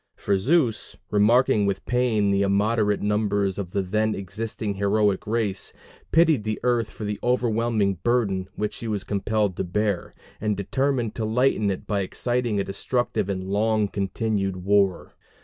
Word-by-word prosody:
For 100 Hz, -, 0 dB
Zeus, 120 Hz, -, +1 dB
remarking 110 Hz, +1 st, +4 dB
with 100 Hz, -1 st, -2 dB
pain 115 Hz, -5 st, +1 dB
the 100 Hz, 0 st, +2 dB
immoderate 105 Hz, +1 st, +1 dB
numbers 100 Hz, -2 st, 0 dB
of 95 Hz, -3 st, -4 dB
the 100 Hz, 0 st, 0 dB
then 110 Hz, +3 st, 0 dB
existing 105 Hz, +2 st, -4 dB
heroic 100 Hz, 0 st, +1 dB
race, 105 Hz, -4 st, -1 dB, 0.4 s
pitied 160 Hz, -8 st, +4 dB
the 110 Hz, 0 st, -2 dB
earth 120 Hz, -3 st, +1 dB
for 110 Hz, -, -9 dB
the 105 Hz, 0 st, -3 dB
overwhelming 115 Hz, -5 st, +1 dB
burden 100 Hz, -6 st, 0 dB
which 105 Hz, 0 st, -2 dB
she 115 Hz, -, -6 dB
was 105 Hz, -3 st, -2 dB
compelled 105 Hz, 0 st, 0 dB
to -, -, -1 dB
bear, 100 Hz, +1 st, -2 dB, 0.3 s
and 105 Hz, -2 st, 0 dB
determined 130 Hz, +2 st, 0 dB
to 115 Hz, -, -4 dB
lighten 110 Hz, -2 st, +2 dB
it 95 Hz, -, -3 dB
by 105 Hz, -2 st, -1 dB
exciting 120 Hz, +2 st, -1 dB
a -, -, +1 dB
destructive 120 Hz, +2 st, -2 dB
and 95 Hz, -1 st, -2 dB
long 105 Hz, +2 st, +1 dB
continued 95 Hz, -1 st, -2 dB
war. 100 Hz, -2 st, +2 dB
105 Hz, 155 wpm, -24 LUFS, 100-115 Hz, 0.4 s, remarking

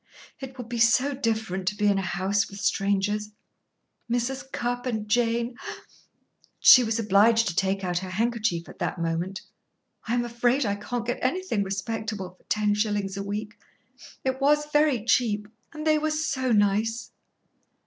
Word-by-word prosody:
"It 265 Hz, -1 st, -8 dB
will 245 Hz, -, -6 dB
be 235 Hz, 0 st, -5 dB
so 250 Hz, +5 st, +4 dB
different 220 Hz, -7 st, -2 dB
to 210 Hz, -, +1 dB
be 210 Hz, 0 st, -1 dB
in 200 Hz, -1 st, +3 dB
a -, -, -1 dB
house 190 Hz, +2 st, 0 dB
with 200 Hz, -, -9 dB
strangers. 205 Hz, +1 st, 0 dB, 0.8 s
Mrs. 250 Hz, +3 st, -2 dB
Cupp 245 Hz, 0 st, -2 dB
and 220 Hz, -3 st, -2 dB
Jane 235 Hz, +1 st, +1 dB, 0.5 s
" -, -, -46 dB, 0.3 s
She 250 Hz, -, +9 dB
was 225 Hz, -1 st, -1 dB
obliged 220 Hz, +1 st, +4 dB
to 175 Hz, -, -5 dB
take 195 Hz, +3 st, 0 dB
out 175 Hz, -1 st, 0 dB
her 185 Hz, 0 st, -7 dB
handkerchief 215 Hz, -4 st, -1 dB
at -, -, -13 dB
that -, -, -2 dB
moment. 170 Hz, +4 st, -2 dB, 0.7 s
"I 235 Hz, -, +1 dB
am 240 Hz, 0 st, 0 dB
afraid 240 Hz, +3 st, +1 dB
I 200 Hz, -, 0 dB
can't 235 Hz, +3 st, -4 dB
get 245 Hz, +1 st, -2 dB
anything 310 Hz, -, 0 dB
respectable 200 Hz, 0 st, -4 dB
for 185 Hz, -, -28 dB
ten 210 Hz, -1 st, +1 dB
shillings 205 Hz, -2 st, -1 dB
a 200 Hz, -, -4 dB
week. 210 Hz, +1 st, -5 dB, 0.6 s
It 265 Hz, 0 st, -2 dB
was 295 Hz, +2 st, +3 dB
very 295 Hz, -7 st, +3 dB
cheap 210 Hz, -2 st, +1 dB, 0.2 s
and 305 Hz, -1 st, -7 dB
they 310 Hz, -1 st, +4 dB
were 310 Hz, +1 st, 0 dB
so 275 Hz, -5 st, -1 dB
nice!" 215 Hz, +2 st, +1 dB
220 Hz, 170 wpm, -26 LUFS, 200-245 Hz, 0.8 s, She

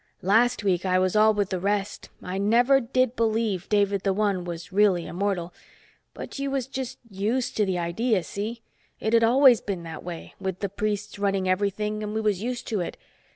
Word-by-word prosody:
Last 220 Hz, +4 st, +3 dB
week 185 Hz, -3 st, +1 dB
I 185 Hz, -1 st, +2 dB
was 185 Hz, +1 st, +1 dB
all 215 Hz, +1 st, +6 dB
with 205 Hz, -2 st, -1 dB
the 185 Hz, -, -1 dB
rest, 200 Hz, +2 st, -2 dB
I 185 Hz, +1 st, -4 dB
never 240 Hz, +7 st, +4 dB
did 255 Hz, 0 st, 0 dB
believe 220 Hz, -4 st, 0 dB
David 200 Hz, -2 st, +2 dB
the 195 Hz, -1 st, +1 dB
One 200 Hz, -3 st, 0 dB
was 170 Hz, +1 st, -7 dB
really 195 Hz, -4 st, +3 dB
Immortal. 180 Hz, -2 st, -2 dB, 0.6 s
But -, -, -7 dB
you 275 Hz, 0 st, -1 dB
was 270 Hz, -2 st, -1 dB
just 265 Hz, -1 st, -5 dB
used 220 Hz, +5 st, -2 dB
to 210 Hz, -2 st, +2 dB
the 185 Hz, -1 st, 0 dB
idea, 185 Hz, +4 st, 0 dB
see? 220 Hz, +6 st, -5 dB, 0.4 s
It'd 230 Hz, +1 st, +3 dB
always 250 Hz, 0 st, +6 dB
been 190 Hz, -4 st, -4 dB
that 165 Hz, -1 st, -8 dB
way, 170 Hz, -2 st, -8 dB
with 190 Hz, -2 st, -3 dB
the 200 Hz, -, -1 dB
priests 210 Hz, +1 st, -3 dB
running 195 Hz, -2 st, 0 dB
everything 205 Hz, +3 st, 0 dB
and 210 Hz, 0 st, -4 dB
we 220 Hz, -, 0 dB
was 210 Hz, -3 st, 0 dB
used 245 Hz, +1 st, -4 dB
to 215 Hz, -, -1 dB
it. 175 Hz, -, -4 dB
205 Hz, 195 wpm, -25 LUFS, 185-225 Hz, 0.6 s, all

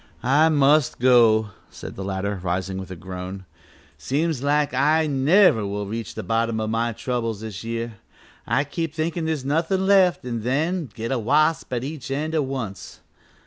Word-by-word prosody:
"I 145 Hz, +6 st, +4 dB
must 145 Hz, -1 st, +3 dB
go," 115 Hz, -4 st, +4 dB, 0.2 s
said -, -, -9 dB
the 95 Hz, -, -6 dB
latter, 100 Hz, +1 st, -3 dB
rising 95 Hz, +1 st, -2 dB
with 95 Hz, -, -8 dB
a 95 Hz, -, -6 dB
groan, 95 Hz, +2 st, -7 dB, 0.5 s
"seems 150 Hz, 0 st, -1 dB
like 145 Hz, 0 st, +1 dB
I 150 Hz, +5 st, +3 dB
never 145 Hz, -, +4 dB
will 100 Hz, +1 st, -3 dB
reach 110 Hz, +2 st, -5 dB
the -, -, -5 dB
bottom 115 Hz, 0 st, 0 dB
o' 110 Hz, -, -1 dB
my 115 Hz, +2 st, 0 dB
troubles 115 Hz, -2 st, -3 dB
this 110 Hz, -2 st, -7 dB
year. 115 Hz, 0 st, -4 dB, 0.5 s
I 140 Hz, -, +2 dB
keep 160 Hz, +2 st, -4 dB
thinkin' 160 Hz, +1 st, -2 dB
there's 155 Hz, -4 st, -2 dB
nothin' 165 Hz, +6 st, 0 dB
left 190 Hz, -7 st, +4 dB
an' 120 Hz, -2 st, -3 dB
then 150 Hz, +6 st, -1 dB
I -, -, -30 dB
get 115 Hz, +2 st, -3 dB
a 130 Hz, -, 0 dB
wasp 155 Hz, +8 st, +2 dB
at 120 Hz, -1 st, -2 dB
each 145 Hz, -1 st, -6 dB
end 150 Hz, +4 st, -2 dB
at 155 Hz, -3 st, +1 dB
once. 125 Hz, -8 st, -6 dB
125 Hz, 180 wpm, -23 LUFS, 110-155 Hz, 0.5 s, I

